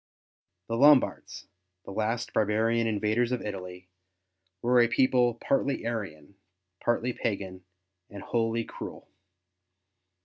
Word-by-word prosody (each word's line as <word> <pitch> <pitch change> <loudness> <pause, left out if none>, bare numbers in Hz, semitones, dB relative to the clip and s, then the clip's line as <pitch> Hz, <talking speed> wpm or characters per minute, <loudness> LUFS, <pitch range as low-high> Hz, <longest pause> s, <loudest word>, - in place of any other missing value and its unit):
The 115 - -2
Lombards, 145 +1 +3 0.4
the - - -8
last 110 +4 -2
barbarian 110 +2 +1
invaders 110 +3 0
of 125 - -2
Italy, 90 -3 -7 0.8
were 125 +1 +4
a 120 - +4
people 125 0 +2
partly 135 +1 -1
Arian, 100 -7 -5 0.4
partly 120 +1 0
pagan, 95 -5 -4 0.5
and 100 -1 -9
wholly 115 0 0
cruel. - - -9
115 Hz, 105 wpm, -28 LUFS, 100-120 Hz, 0.8 s, were